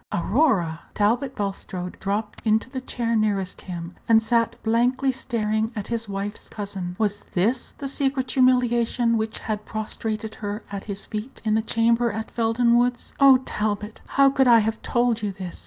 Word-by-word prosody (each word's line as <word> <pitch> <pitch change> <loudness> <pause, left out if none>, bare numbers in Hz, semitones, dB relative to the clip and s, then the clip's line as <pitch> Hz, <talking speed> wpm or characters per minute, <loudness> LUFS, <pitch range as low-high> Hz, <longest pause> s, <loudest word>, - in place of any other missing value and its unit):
"Aurora!" 190 - +1 0.2
Talbot 240 +6 +1
Bulstrode 190 -3 -4
dropped 210 +2 -3
into 220 +3 +1
the 260 -2 -4
chair 235 -2 -2
nearest 200 -4 0
him, 175 -1 -7 0.2
and 225 -1 +6
sat 230 0 +2
blankly 245 +4 +2
staring 220 -3 -1
at 205 -2 -5
his 230 -2 -2
wife's 200 +2 -5
cousin. 195 -4 -5
Was 205 -2 -1
this 225 +8 0
the 275 - -4
secret 270 -2 0
humiliation 245 -2 +3
which 220 0 -2
had 215 -1 -3
prostrated 220 0 -4
her 205 +1 -4
at 200 -1 -5
his 200 -2 -5
feet 215 +5 -6
in 215 - +2
the 220 - +3
chamber 230 +1 +2
at 220 +2 -5
Felden 235 +1 +3
Woods? 245 0 -1
"Oh, 270 -2 +7
Talbot, 210 0 -3 0.2
how 275 0 +6
could 265 -1 +3
I 235 -1 +8
have 220 0 0
told 240 -2 +1
you 205 -2 -1
this? 185 -2 -7
225 Hz, 170 wpm, -24 LUFS, 205-240 Hz, 0.2 s, I